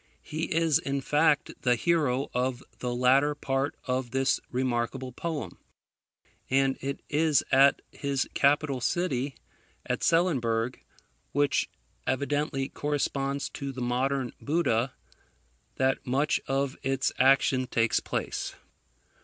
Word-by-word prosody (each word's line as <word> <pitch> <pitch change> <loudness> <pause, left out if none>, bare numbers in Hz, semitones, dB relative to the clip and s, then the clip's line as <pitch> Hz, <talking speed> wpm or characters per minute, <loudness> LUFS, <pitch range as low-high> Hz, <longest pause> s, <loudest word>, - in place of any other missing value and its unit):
He 160 +1 -3
is, 165 -3 +2
in 140 0 -2
fact, 150 +1 +1
the 125 -1 +3
hero 140 -3 +1
of 125 +1 -1 0.2
the 125 - -2
latter 135 +4 +4
part 135 -1 -1
of 125 -1 -1
this 135 +3 +1
remarkable 125 0 -1
poem; 160 +3 -5 0.9
and 135 0 +3
it 140 +1 -4
is 150 -2 +3
at 135 +1 +5
his 140 -2 -1
capital 140 -2 +2
city, 140 -3 -1 0.5
Etselenburgh, 125 -9 +1 0.5
which 145 0 +2 0.4
evidently 140 0 0
corresponds 140 -1 -1
to 140 -1 -5
the 130 - -8
modern 125 +1 0
Buda, 135 -6 +1 0.8
that 130 0 +1
much 140 +4 +1
of 135 0 0
its 135 -1 0
action 130 -1 +4
takes 115 -1 +2
place. - - -3
135 Hz, 110 wpm, -28 LUFS, 130-145 Hz, 0.9 s, at